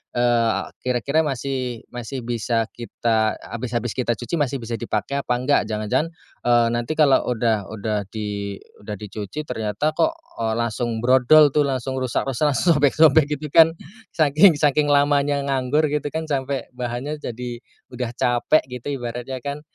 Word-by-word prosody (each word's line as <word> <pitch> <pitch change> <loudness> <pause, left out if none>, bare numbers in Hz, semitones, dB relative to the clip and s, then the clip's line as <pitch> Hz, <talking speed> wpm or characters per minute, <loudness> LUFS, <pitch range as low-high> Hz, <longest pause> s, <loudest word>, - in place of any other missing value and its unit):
eee, 120 -2 +2 0.2
kira-kira 130 +5 +1
masih 130 -3 -3
masih 125 +2 -5
bisa 115 -1 0
kita 115 -2 -1
habis 115 0 -6
habis 120 -1 -3
kita 120 -2 0
cuci 120 +7 -3
masih 145 -4 0
bisa 115 0 -4
dipake 115 +2 -3
apa 140 -3 -2
enggak, 130 +3 +2
jangan-jangan 110 +9 -1 0.4
eee, 120 -1 +4
nanti 120 +4 -2
kalo 145 -4 +5
udah 115 -4 0
udah 105 -1 -2
di 100 -2 -4 0.2
udah 105 0 -5
dicuci 105 +7 -6
ternyata 115 +6 -2
kok 320 - +2 0.3
eee, 110 -1 0
langsung 115 0 -2
brodol 130 +5 +6
tuh 150 - +4
langsung 130 -1 -2
rusak-rusak, 135 +3 0
langsung 165 +4 +3
sobek-sobek 145 +1 +5
gitu 150 - -5
kan. 165 0 +7 0.4
Saking 155 +2 +5
saking 145 0 +2
lamanya 145 0 +3
nganggur 140 +3 +1
gitu 150 0 -2
kan, 160 0 -3
sampe 140 -2 -2
bahannya 125 +4 -4
jadi 120 -1 -6 0.3
udah 125 -1 -3
capek 120 +6 +2
gitu, 125 +1 -8
ibaratnya 120 +2 -5
kan. 140 +3 -5
125 Hz, 150 wpm, -22 LUFS, 115-145 Hz, 0.4 s, kan